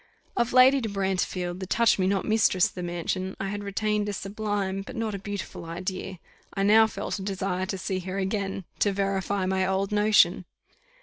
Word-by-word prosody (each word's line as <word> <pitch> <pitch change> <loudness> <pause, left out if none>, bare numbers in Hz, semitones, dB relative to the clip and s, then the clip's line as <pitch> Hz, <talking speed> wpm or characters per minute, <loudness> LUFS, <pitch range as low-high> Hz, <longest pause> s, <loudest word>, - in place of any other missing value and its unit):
_ - - -31 0.3
Of 235 0 +1
Lady 260 +2 +6
de 225 - -2
Brantefield, 185 -2 -2
the 190 - -5
touch 230 +1 +3
me 185 - +2
not 195 -1 0
mistress 215 -4 +3
of - - -3
the 180 - -6
mansion, 175 +2 -3
I 195 - -2
had 205 +1 -4
retained 210 +1 -1
a - - -2
sublime, 200 -1 -2
but 255 +6 -9
not 225 -2 -2
a 200 - -4
beautiful 200 -5 -6
idea 185 +3 -5 0.4
I 195 - 0
now 220 +2 +6
felt 205 -1 -4
a - - -6
desire 190 -1 -2
to 195 - -3
see 185 0 -2
her 185 +1 -5
again, 195 -1 -2
to 205 - +2
verify 195 0 -1
my 190 0 +1
old 190 +1 0
notion. 210 -4 +4
195 Hz, 200 wpm, -26 LUFS, 185-210 Hz, 0.4 s, Lady